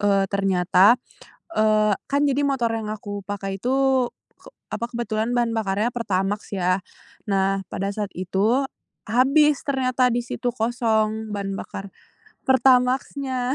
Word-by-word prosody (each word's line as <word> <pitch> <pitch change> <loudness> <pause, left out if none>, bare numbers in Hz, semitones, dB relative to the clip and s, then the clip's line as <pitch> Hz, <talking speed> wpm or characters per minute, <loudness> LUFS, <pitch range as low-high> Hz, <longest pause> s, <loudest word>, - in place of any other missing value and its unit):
eee, 200 -1 +3
ternyata, 195 +3 +4 0.6
eee, 215 -1 +3 0.2
kan 280 +1 +2
jadi 280 +1 +1
motor 265 -4 +1
yang 225 -1 -4
aku 205 -2 -6
pakai 195 -1 -4
itu 265 +2 +2 0.3
ke - - -15 0.2
apa, 235 - -3
kebetulan 230 0 -2
bahan 240 -1 +1
bakarnya 210 +2 0
Pertamax 205 -3 -2
ya. 185 -1 +1 0.5
Nah 195 -1 0
pada 195 +1 -2
saat 205 -1 -4
itu 195 +8 +1 0.5
habis 280 +5 +4
ternyata 255 -2 +1
di 240 - +1
situ 245 +1 -3
kosong 220 -2 0
bahan 195 -1 -3
bakar 195 0 -7 0.6
Pertamax-nya. 260 0 +2
220 Hz, 130 wpm, -23 LUFS, 200-250 Hz, 0.6 s, ternyata